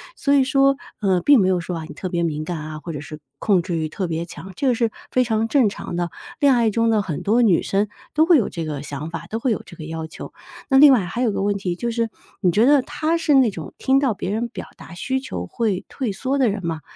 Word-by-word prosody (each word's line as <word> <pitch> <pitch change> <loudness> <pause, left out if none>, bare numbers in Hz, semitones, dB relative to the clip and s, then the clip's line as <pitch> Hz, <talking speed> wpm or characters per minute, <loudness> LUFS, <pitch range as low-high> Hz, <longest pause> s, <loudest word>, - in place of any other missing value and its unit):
所 280 - +1
以 275 -2 +5
说， 275 +1 +3 0.3
呃， 190 -3 +2
并 285 +3 +6
没 190 - +3
有 185 -1 +2
说 175 +1 -4
啊， 160 - -6
你 - - -9
特 185 - -4
别 175 -1 -1
敏 155 -2 -2
感 170 +1 -4
啊， 155 0 -7
或 165 +2 -7
者 145 - -5
是 155 0 -9 0.2
控 190 -5 +2
制 175 -1 -3
欲 155 -1 -2
特 185 +4 -3
别 165 0 -3
强， 185 +2 -10
这 275 - -1
个 250 - +3
是 230 -1 0 0.2
非 255 - +3
常 225 -1 0
正 250 -3 +3
常 185 - -7
的。 175 -1 -2 0.3
恋 285 -3 +5
爱 235 -2 +3
中 230 +2 +1
的 215 - +3
很 175 -7 -4
多 230 +4 +3
女 195 -8 +4
生 200 +2 0 0.3
都 310 +1 +4
会 340 -4 +7
有 220 - +1
这 165 - -5
个 150 -3 -4
想 145 +2 -6
法， 170 - -6
都 225 - -3
会 250 +1 0
有 215 - -2
这 175 - -12
个 155 - -8
要 160 0 -5
求。 155 - -9 0.4
那 270 - +5
另 285 0 +9
外 220 -8 +3
还 235 +8 -4
有 245 - +2
一 - - -2
个 - - -2
问 205 0 +1
题 185 -3 -2
就 235 +2 -2
是， 230 -1 -1 0.3
你 180 - +3
觉 215 +6 +3
得 280 0 +5
他 310 +4 -1
是 320 -2 +1
那 260 -4 +5
种 160 -7 -8
听 270 +1 +3
到 270 -5 +1
别 195 0 -4
人 235 +3 -2
表 - - -8
达 - - -12
需 260 +9 -2
求 90 - -5
会 210 - -1
退 250 -6 -3
缩 265 +7 -2
的 255 -5 +3
人 195 -3 -4
吗？ 160 -2 -3
205 Hz, 305 characters per minute, -22 LUFS, 170-255 Hz, 0.4 s, 另